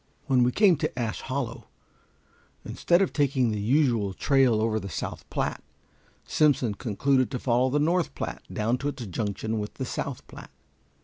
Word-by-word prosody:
When 130 Hz, -4 st, +3 dB
we 125 Hz, +1 st, +3 dB
came 190 Hz, -, +4 dB
to -, -, -3 dB
Ash 115 Hz, -3 st, -2 dB
Hollow, 130 Hz, -4 st, -4 dB, 1.0 s
instead 175 Hz, +2 st, +2 dB
of -, -, -2 dB
taking 135 Hz, -5 st, +2 dB
the 105 Hz, -, -2 dB
usual 115 Hz, -5 st, +2 dB
trail 130 Hz, -4 st, +3 dB
over 110 Hz, 0 st, +1 dB
to -, -, 0 dB
the 100 Hz, -, -7 dB
South 80 Hz, -, -6 dB
Platte, -, -, -2 dB, 0.6 s
Simpson 135 Hz, -7 st, +2 dB
concluded 130 Hz, +4 st, +1 dB
to 125 Hz, -, -3 dB
follow 125 Hz, +1 st, +1 dB
the 140 Hz, -, +1 dB
North 170 Hz, +4 st, +1 dB
Platte -, -, -5 dB
down 115 Hz, +4 st, 0 dB
to 140 Hz, -, -3 dB
its 145 Hz, -4 st, -4 dB
junction 105 Hz, +3 st, -3 dB
with 105 Hz, 0 st, -5 dB
the 130 Hz, -, -4 dB
South 130 Hz, +1 st, -5 dB
Platte. -, -, -12 dB
125 Hz, 175 wpm, -26 LUFS, 110-140 Hz, 1.0 s, came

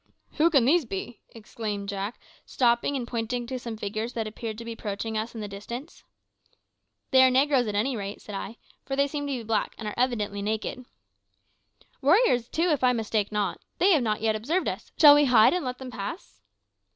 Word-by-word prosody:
"Who 320 Hz, +2 st, +5 dB
can 275 Hz, -8 st, +4 dB
these 325 Hz, +5 st, +4 dB
be?" 225 Hz, +1 st, -6 dB, 0.3 s
cried 210 Hz, -3 st, -3 dB
Jack, 200 Hz, +2 st, -4 dB, 0.2 s
stopping 240 Hz, +2 st, +1 dB
and 245 Hz, -3 st, -3 dB
pointing 240 Hz, +1 st, -3 dB
to 255 Hz, +1 st, -5 dB
some 230 Hz, -2 st, -6 dB
figures 215 Hz, +3 st, -4 dB
that 225 Hz, -2 st, -2 dB
appeared 215 Hz, 0 st, -6 dB
to 230 Hz, -, -8 dB
be 230 Hz, -, -5 dB
approaching 220 Hz, 0 st, -4 dB
us 220 Hz, +2 st, -3 dB
in 225 Hz, -, -5 dB
the 210 Hz, -, -4 dB
distance. 235 Hz, -, -8 dB, 1.1 s
"They 260 Hz, -, +7 dB
are 260 Hz, -, +6 dB
negroes, 265 Hz, -1 st, +3 dB
at 210 Hz, -, -3 dB
any 245 Hz, +6 st, 0 dB
rate," 200 Hz, -1 st, -5 dB
said 210 Hz, -, -10 dB
I; 200 Hz, +3 st, -6 dB, 0.3 s
"for 270 Hz, -, -3 dB
they 280 Hz, +1 st, +3 dB
seem 290 Hz, 0 st, -4 dB
to 275 Hz, -2 st, -2 dB
be 235 Hz, -, -6 dB
black, 220 Hz, -1 st, -1 dB
and 220 Hz, -, -6 dB
are 210 Hz, -, -3 dB
evidently 215 Hz, -5 st, 0 dB
naked." 220 Hz, +4 st, -3 dB, 1.2 s
"Warriors, 285 Hz, -, +3 dB
too, 340 Hz, +2 st, +1 dB
if 290 Hz, -4 st, 0 dB
I 250 Hz, 0 st, +5 dB
mistake 215 Hz, -3 st, -1 dB
not. 210 Hz, -1 st, -1 dB, 0.2 s
They 385 Hz, +3 st, +4 dB
have 310 Hz, -7 st, +4 dB
not 215 Hz, -2 st, -1 dB
yet 220 Hz, -1 st, +1 dB
observed 300 Hz, +13 st, -1 dB
us. -, -, -5 dB
Shall 295 Hz, -2 st, +10 dB
we 290 Hz, 0 st, +5 dB
hide 235 Hz, -4 st, +6 dB
and 360 Hz, -, -1 dB
let 250 Hz, -1 st, -4 dB
them 260 Hz, -1 st, -8 dB
pass?" 195 Hz, -, -7 dB
235 Hz, 205 wpm, -26 LUFS, 215-265 Hz, 1.2 s, Shall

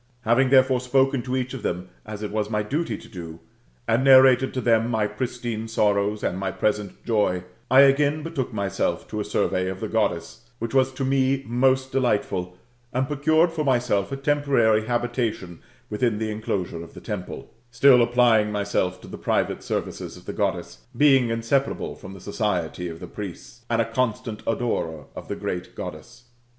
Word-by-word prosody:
Having 120 Hz, +3 st, +3 dB
therefore 130 Hz, -1 st, +5 dB
spoken 135 Hz, +1 st, +2 dB
to 130 Hz, +1 st, -3 dB
each 130 Hz, 0 st, -3 dB
of 130 Hz, -, -6 dB
them, 90 Hz, 0 st, -3 dB, 0.2 s
as 105 Hz, 0 st, -6 dB
it 105 Hz, -, -4 dB
was 105 Hz, 0 st, -1 dB
my 105 Hz, -1 st, 0 dB
duty 150 Hz, +10 st, -2 dB
to -, -, -14 dB
do, 85 Hz, -5 st, -9 dB, 0.5 s
and 115 Hz, +3 st, +2 dB
narrated 130 Hz, -1 st, +6 dB
to -, -, 0 dB
them 115 Hz, -1 st, +2 dB
my 110 Hz, -3 st, +1 dB
pristine 115 Hz, +1 st, -4 dB
sorrows 105 Hz, -1 st, +1 dB
and 90 Hz, -, -1 dB
my 95 Hz, 0 st, -1 dB
present 105 Hz, 0 st, -2 dB
joy, 105 Hz, -6 st, +1 dB, 0.3 s
I 130 Hz, +1 st, +7 dB
again 145 Hz, +2 st, +3 dB
betook 155 Hz, -7 st, -3 dB
myself 100 Hz, -3 st, -2 dB
to -, -, -4 dB
a -, -, -1 dB
survey 95 Hz, 0 st, 0 dB
of 95 Hz, 0 st, -5 dB
the 110 Hz, -, -3 dB
Goddess, 110 Hz, +1 st, -2 dB
which 115 Hz, +1 st, -5 dB
was 135 Hz, 0 st, +3 dB
to 135 Hz, 0 st, -3 dB
me 135 Hz, 0 st, +1 dB
most 130 Hz, +2 st, +1 dB
delightful, 100 Hz, -8 st, -1 dB, 0.3 s
and 130 Hz, +1 st, 0 dB
procured 155 Hz, +4 st, +2 dB
for 160 Hz, -2 st, -2 dB
myself 120 Hz, -6 st, +1 dB
a 135 Hz, -, -3 dB
temporary 135 Hz, -6 st, +2 dB
habita 120 Hz, -1 st, 0 dB
tion 85 Hz, -2 st, -11 dB, 0.3 s
within 105 Hz, +1 st, 0 dB
the 110 Hz, 0 st, -2 dB
enclosure 100 Hz, -6 st, -3 dB
of 85 Hz, -, -14 dB
the -, -, -8 dB
temple; 90 Hz, -, -7 dB, 0.2 s
still 125 Hz, +2 st, +6 dB
applying 120 Hz, -3 st, +3 dB
myself 100 Hz, -3 st, -1 dB
to -, -, -12 dB
the -, -, -9 dB
private -, -, 0 dB
services -, -, -4 dB
of -, -, -16 dB
the -, -, -5 dB
Goddess, -, -, -2 dB, 0.2 s
being 135 Hz, -5 st, +5 dB
inseparable 115 Hz, +4 st, -1 dB
from 95 Hz, -, -11 dB
the 95 Hz, -, -12 dB
society 90 Hz, -4 st, -2 dB
of 80 Hz, 0 st, -9 dB
the -, -, -5 dB
priests, 105 Hz, +4 st, -9 dB
and 115 Hz, 0 st, +1 dB
a 115 Hz, -, +3 dB
constant 115 Hz, -1 st, -2 dB
adorer 85 Hz, -, -2 dB
of -, -, -8 dB
the -, -, -3 dB
great 90 Hz, 0 st, -5 dB
Goddess. 120 Hz, 0 st, -8 dB
115 Hz, 185 wpm, -24 LUFS, 105-130 Hz, 0.5 s, I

